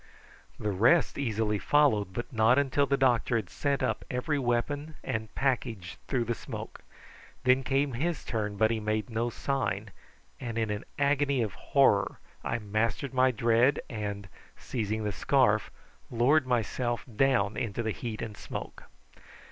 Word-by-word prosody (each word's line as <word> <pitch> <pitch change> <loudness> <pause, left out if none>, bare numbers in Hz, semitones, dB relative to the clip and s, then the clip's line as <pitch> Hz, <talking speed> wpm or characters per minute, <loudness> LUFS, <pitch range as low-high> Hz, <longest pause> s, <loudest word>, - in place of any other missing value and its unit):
The 105 - -1
rest 120 - +3
easily 110 -5 0
followed, 120 -10 +3
but 120 +7 -5
not 110 +3 +4
until 140 0 +2
the 140 - +2
doctor 125 -2 +2
had 110 -6 -2
sent 140 -1 -1
up - - -1
every 135 +4 -1
weapon 145 +5 -1
and 110 -4 -3
package 115 -9 -1
through 130 -3 +1
the 120 - 0
smoke. - - -8 0.6
Then 130 +1 +4
came 135 +1 0
his 160 +5 -2
turn, 105 -3 -2
but 110 +1 +3
he 115 - 0
made 110 +2 -2
no 115 +2 0
sign, 110 -5 -2 0.5
and 115 -3 -5
in 110 -2 0
an 105 +2 -4
agony 140 -2 +2
of 105 - -4
horror - - +2 0.3
I 115 - -1
mastered 110 +5 -1
my 130 0 +4
dread, 120 +3 +3
and, 100 -3 -4 0.3
seizing 110 -2 -3
the 105 - -1
scarf, 95 - +2 0.4
lowered 130 +5 +3
myself 120 0 0
down 110 -5 +2
into 115 +1 -2
the 110 - -1
heat 115 0 -5
and 110 -2 -6
smoke. - - -7
120 Hz, 155 wpm, -29 LUFS, 110-135 Hz, 0.6 s, not